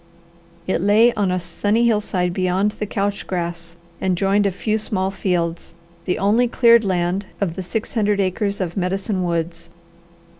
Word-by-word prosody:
It 185 -3 0
lay 215 +5 +5
on 200 -3 0
a 180 0 0
sunny 205 +7 0
hillside 200 -6 +1
beyond 185 +3 +1
the 210 0 -5
couch 200 0 -2
grass 170 -2 -4 0.3
and 185 -2 +1
joined 200 +2 +2
a - - 0
few 215 +3 -1
small 190 -3 -2
fields, 175 -4 -2 0.3
the 180 - 0
only 220 +5 +3
cleared 235 -1 +5
land 185 0 -1
of 180 -5 -1
the - - -4
six 215 +5 -4
hundred 210 -3 +1
acres 200 +2 -1
of 175 -3 -3
Medicine 190 +1 -1
Woods. 170 -1 -3
195 Hz, 160 wpm, -21 LUFS, 180-210 Hz, 0.3 s, lay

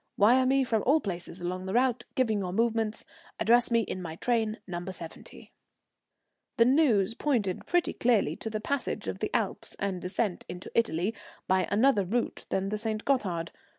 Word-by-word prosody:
Wire 250 +5 +5
me 270 +1 +3
from 225 -4 0
all 295 +4 +5
places 180 - -5
along 185 +1 -4
the 190 - -2
route, 245 -1 +2
giving 225 -5 +2
your 185 -2 -3
movements. 225 +1 0 0.3
Address 240 +2 +4
me 230 -1 +3
in 185 -3 -4
my 160 -2 -6
train 225 +2 0
No. 175 -2 -5
70." 170 -3 -9 1.1
The 230 - +6
news 240 -7 +3
pointed 230 -9 -1
pretty 350 -1 +1
clearly 235 -4 +2
to 225 - -5
the 215 -1 -3
passage 280 +6 -2
of - - -3
the - - -1
Alps - - -2
and 195 -3 -2
descent 185 +1 -1
into 180 +1 -7
Italy 215 -3 +1 0.3
by 185 -2 +2
another 215 +1 +3
route 230 +6 -2
than 190 +1 -1
the 210 +1 -2
St. 215 -1 -3
Gothard. 185 -11 0
215 Hz, 175 wpm, -29 LUFS, 185-240 Hz, 1.1 s, The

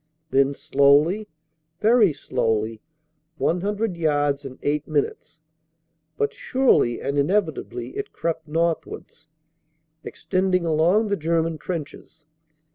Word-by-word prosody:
Then 135 +1 +3
slowly, 145 +12 +3 0.5
very 220 -4 +5
slowly 110 -6 -2 0.6
100 200 +4 -1
yards 145 -3 0
in 130 -1 -8
eight 150 +1 -1
minutes 155 +1 -3 0.8
but 140 0 0
surely 255 - +2
and 140 +1 -1
inevitably 190 - -1
it 415 0 -5
crept 165 -1 -3
northwards, 160 -1 -3 0.8
extending 185 -2 -1
along 170 +7 +2
the 200 - +1
German 165 0 0
trenches. 160 -2 -7
160 Hz, 100 wpm, -23 LUFS, 145-185 Hz, 0.8 s, very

